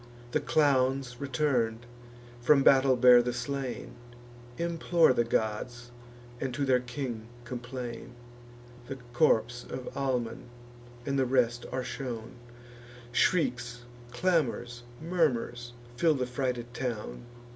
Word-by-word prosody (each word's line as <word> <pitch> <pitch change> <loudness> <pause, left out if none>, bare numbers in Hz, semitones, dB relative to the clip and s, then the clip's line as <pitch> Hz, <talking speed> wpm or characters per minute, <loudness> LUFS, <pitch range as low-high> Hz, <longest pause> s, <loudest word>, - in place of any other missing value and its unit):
The - - +2
clowns, 135 -4 +2
return'd, 125 -4 0 0.5
from 135 +3 +4
battle 135 -1 +6
bear 125 0 +8
the 120 0 -2
slain, 135 0 -4 0.6
Implore 170 -2 +3
the 120 - +2
gods, 120 +2 -2 0.5
and 135 - -2
to 140 - 0
their 130 -2 +4
king 125 -3 -5 0.2
complain. 125 -1 -6 0.7
The 135 - -4 0.2
corps 120 -3 +2
of 130 -1 -6
Almon 125 -5 -2 0.6
and 140 -1 0
the 130 - +2
rest 120 -2 +1
are 130 0 -2
shown; 120 -4 -5 0.8
Shrieks, 125 -6 +1 0.3
clamours, 120 -6 0 0.2
murmurs, 125 -8 -1 0.2
fill 160 0 +4
the 130 -2 -1
frighted 125 -1 -3
town. 110 - -4
125 Hz, 110 wpm, -29 LUFS, 120-135 Hz, 0.8 s, bear